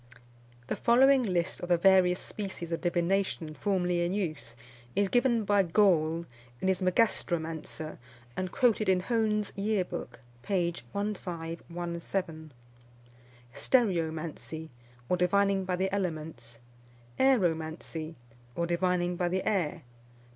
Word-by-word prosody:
The - - -2
following 265 +3 +5
list 180 -6 -1
of 175 - -6
the 175 - +5
various 185 0 +5
species 190 -5 -6
of 165 - -2
divination 175 -2 0
formerly 180 +1 0
in 175 +2 -1
use, 155 - -3 0.4
is 200 -1 +2
given 245 -1 +2
by 205 0 +4
Gaule 170 -3 +2 0.3
in - - -1
his 190 0 +1
Magastromancer, 165 -5 -1 0.4
and 185 +3 -3
quoted 225 -5 +2
in 185 -1 +3
Hone's 215 -1 0
Year 200 -1 0
Book, - - -7 0.2
p. 175 +3 0 0.2
1517. 170 -3 -4 1.0
Stereomancy, 160 - 0 0.4
or 180 - +1
divining 195 +2 +2
by 185 -1 0
the 190 +1 -1
elements. 155 -11 -4 0.6
Aeromancy, 165 -9 0 0.4
or 170 - 0
divining 175 0 0
by 175 0 0
the 185 +1 -2
air. 185 -8 0
180 Hz, 115 wpm, -29 LUFS, 165-200 Hz, 1.0 s, following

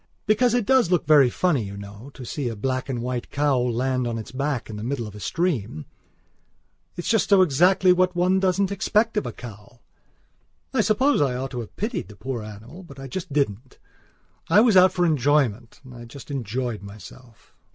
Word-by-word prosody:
Because 235 +3 +2
it 245 -4 +1
does 260 -5 +3
look 180 -3 +1
very 145 -5 +6
funny, 160 0 +1
you 100 -1 -7
know, 100 +5 -10
to 125 - -9
see 135 0 -3
a 115 - -5
black 130 +5 -3
and 120 -3 -3
white 125 -1 -4
cow 145 -2 +1
land 125 +1 -1
on 115 -1 -3
its 110 - -8
back 135 -1 -2
in 110 - -8
the 105 - -6
middle 120 -1 -3
of 105 - -9
a 105 - -10
stream. 115 - -2 1.1
It 175 - -4
is - - -6
so 225 - +3
just - - -2
exactly 185 +1 +4
what 180 0 +1
one 180 +2 +2
doesn't 190 +1 +1
expect 220 +3 +1
of 210 - -1
a - - -4
cow. 115 -1 -12 0.9
I 255 - +3
suppose 220 - +2
I 135 -3 +1
ought 130 +2 -4
to 125 - -5
have 115 - -8
pitied 215 - -3
the 105 - -13
poor 120 +3 -5
animal; 110 - -11
but 140 -7 -13
I 135 - -7
just 175 +5 -6
didn't. 130 -4 -2 0.7
I 180 +6 +6
was 225 -2 +4
out 185 0 +7
for 175 -1 +1
enjoyment. 135 -7 +1
And 130 -1 -13
I 120 -1 -10
just 135 +4 -11
enjoyed 120 -3 -3
myself. 105 +3 -14
135 Hz, 205 wpm, -23 LUFS, 120-180 Hz, 1.1 s, out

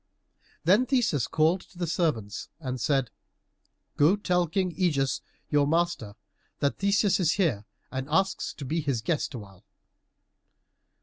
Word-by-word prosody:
Then 205 +10 +4
Theseus 235 - +1
called 165 +4 +2
to 180 - -19
the 175 - -1
servants 150 - -1
and 130 -5 -4
said, 135 -5 +1 0.9
"Go 155 +7 +5
tell 180 -4 +1
King 185 +1 -1
Ægeus, 150 -6 +1 0.3
your 145 -1 +3
master, 165 -10 0 0.4
that 140 -1 -1
Theseus 200 0 +3
is 170 -4 +3
here 145 - 0 0.3
and 130 +1 -4
asks 195 0 +1
to 140 - -7
be 160 +5 -1
his 135 -7 -1
guest 155 -1 -1
awhile." 100 -5 -11
155 Hz, 135 wpm, -27 LUFS, 135-180 Hz, 0.9 s, Go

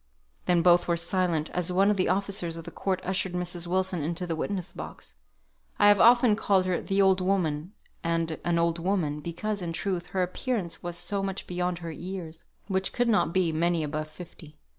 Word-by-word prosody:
Then 175 -2 +3
both 175 0 +5
were 170 -1 +1
silent, 170 -2 0
as 180 0 0
one 195 +3 +4
of - - +1
the 185 - +1
officers 185 -3 0
of 165 - -7
the - - -9
court 190 -2 -1
ushered 190 0 0
Mrs. 175 -1 -3
Wilson 185 -1 0
into 170 +4 -2
the 165 -2 -2
witness 185 +2 -3
box. - - -9 0.6
I 205 - +6
have 205 -1 +5
often 240 -2 +6
called 195 -3 +2
her 185 -2 0
"the 195 0 -1
old 190 -1 +4
woman," 180 -2 0 0.3
and 165 -1 -1
"an 170 -1 +1
old 170 0 +1
woman," 165 -5 0
because, 190 +6 -3
in 170 -2 -3
truth, 180 -1 -2
her 185 -1 0
appearance 185 -1 -3
was 175 -1 -4
so 195 +3 -1
much 195 0 -3
beyond 180 0 -2
her 165 - -4
years, 165 -1 -7 0.2
which 190 -1 -1
might 245 -1 +2
not 210 -6 +3
be 180 -2 +2
many 170 +1 +1
above 155 +1 -3
fifty. 155 -2 -12
180 Hz, 200 wpm, -27 LUFS, 170-195 Hz, 0.6 s, I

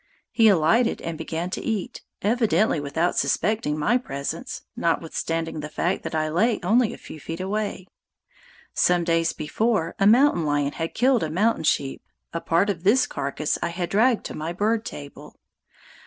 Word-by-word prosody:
He 225 -2 +4
alighted 200 +5 +3
and 165 0 -3
began 165 +3 -4
to - - -3
eat, 215 -5 -3 0.2
evidently 215 -5 +2
without 155 +5 -1
suspecting 150 +2 0
my 215 +12 +2
presence, 140 - -5
notwithstanding 165 -1 -2
the 150 0 -5
fact 175 +4 -1
that - - -5
I 155 0 +1
lay 210 +9 +1
only 235 0 +3
a - - -8
few 155 - -11
feet 165 +4 -6
away. 200 0 -3 0.9
Some 180 -1 +3
days 165 -1 +1
before, 180 +3 -1
a 195 - +4
mountain 240 - +5
lion 145 -1 0
had 165 +2 -5
killed 250 0 +3
a 160 - -1
mountain 205 +3 +1
sheep; 135 -2 0 0.3
a 170 - -3
part 180 +5 +2
of 170 -3 -7
this 235 +7 +4
carcass 140 +2 -2
I - - -1
had 175 0 -4
dragged 230 +3 +3
to - - -5
my 160 +2 -4
bird 220 +4 0
table. 145 -1 -9
175 Hz, 170 wpm, -24 LUFS, 160-215 Hz, 0.9 s, mountain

